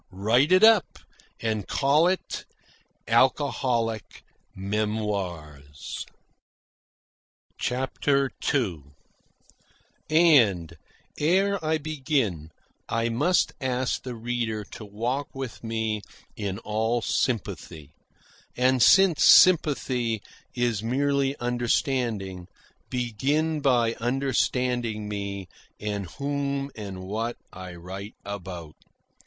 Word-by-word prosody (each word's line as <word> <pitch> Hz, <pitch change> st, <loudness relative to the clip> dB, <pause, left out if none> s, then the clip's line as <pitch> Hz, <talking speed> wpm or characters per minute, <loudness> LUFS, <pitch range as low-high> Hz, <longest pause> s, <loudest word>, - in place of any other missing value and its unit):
Write 115 Hz, -, +2 dB
it 185 Hz, +2 st, +6 dB
up 220 Hz, -4 st, +5 dB, 0.4 s
and 110 Hz, -3 st, -2 dB
call 145 Hz, +4 st, +3 dB
it 185 Hz, +1 st, -2 dB, 0.6 s
'Alcoholic 115 Hz, -3 st, +1 dB, 0.3 s
Memoirs.'" 95 Hz, -8 st, -4 dB, 1.5 s
CHAPTER 135 Hz, +2 st, 0 dB, 0.2 s
II 100 Hz, -, 0 dB, 1.3 s
And, 120 Hz, -, +4 dB, 0.4 s
ere 190 Hz, +4 st, +2 dB
I 160 Hz, 0 st, +1 dB
begin, 135 Hz, -, -1 dB, 0.4 s
I 115 Hz, 0 st, 0 dB
must 175 Hz, +11 st, +2 dB
ask 130 Hz, -1 st, -1 dB
the 125 Hz, -2 st, -6 dB
reader 115 Hz, -2 st, -2 dB
to -, -, -8 dB
walk 120 Hz, +7 st, -2 dB
with 135 Hz, -4 st, -6 dB
me 110 Hz, -2 st, -2 dB, 0.3 s
in 100 Hz, -2 st, -3 dB
all 110 Hz, +2 st, -1 dB
sympathy; 85 Hz, -, -2 dB, 0.6 s
and, 130 Hz, 0 st, +3 dB
since 190 Hz, -, +6 dB
sympathy 125 Hz, -, +5 dB, 0.3 s
is 120 Hz, -4 st, 0 dB
merely 140 Hz, +3 st, 0 dB
understanding, 120 Hz, -, -1 dB, 0.4 s
begin 140 Hz, +7 st, 0 dB
by 120 Hz, -5 st, +3 dB
understanding 125 Hz, -3 st, 0 dB
me 100 Hz, -2 st, -4 dB, 0.3 s
and 100 Hz, -2 st, -3 dB
whom 140 Hz, +2 st, -2 dB
and 100 Hz, -4 st, -7 dB
what 110 Hz, +5 st, -3 dB, 0.2 s
I 95 Hz, -1 st, -8 dB
write 95 Hz, +4 st, -8 dB
about. 90 Hz, -5 st, -7 dB
120 Hz, 90 wpm, -26 LUFS, 105-140 Hz, 1.5 s, it